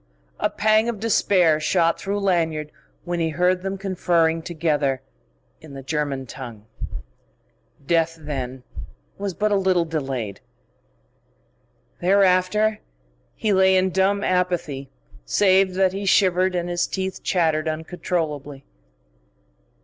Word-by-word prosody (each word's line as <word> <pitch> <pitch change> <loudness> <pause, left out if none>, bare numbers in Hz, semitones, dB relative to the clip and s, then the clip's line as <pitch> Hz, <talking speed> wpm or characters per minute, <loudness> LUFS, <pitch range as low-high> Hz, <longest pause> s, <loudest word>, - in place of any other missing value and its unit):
A - - +1
pang 215 +2 +2
of 225 -4 -4
despair 185 -7 +3
shot 165 +2 +1
through 200 +1 -2
Lanyard 160 -5 0 0.3
when 175 -1 -3
he 165 -1 +1
heard 180 +3 +1
them 195 +1 -3
conferring 170 -4 +1
together 150 -5 0 0.6
in 150 -3 -12
the 135 - -8
German 140 -2 -2
tongue. 115 -4 -9 1.2
Death, 165 +1 +1
then, 130 -4 -5 0.6
was 200 -3 -3
but 210 +5 0
a - - +3
little 185 -3 +2
delayed. 135 -10 -4 1.6
Thereafter 195 +3 +3 0.6
he 215 -2 0
lay 190 0 +5
in 185 0 +2
dumb 195 +2 +1
apathy, 175 -7 -1 0.3
save 190 - +3
that 190 -1 +2
he 200 0 -4
shivered 185 -1 +3
and 175 0 -1
his 175 0 0
teeth 190 -1 -4
chattered 160 -4 +1
uncontrollably. 155 -3 -3
175 Hz, 120 wpm, -23 LUFS, 155-190 Hz, 1.6 s, lay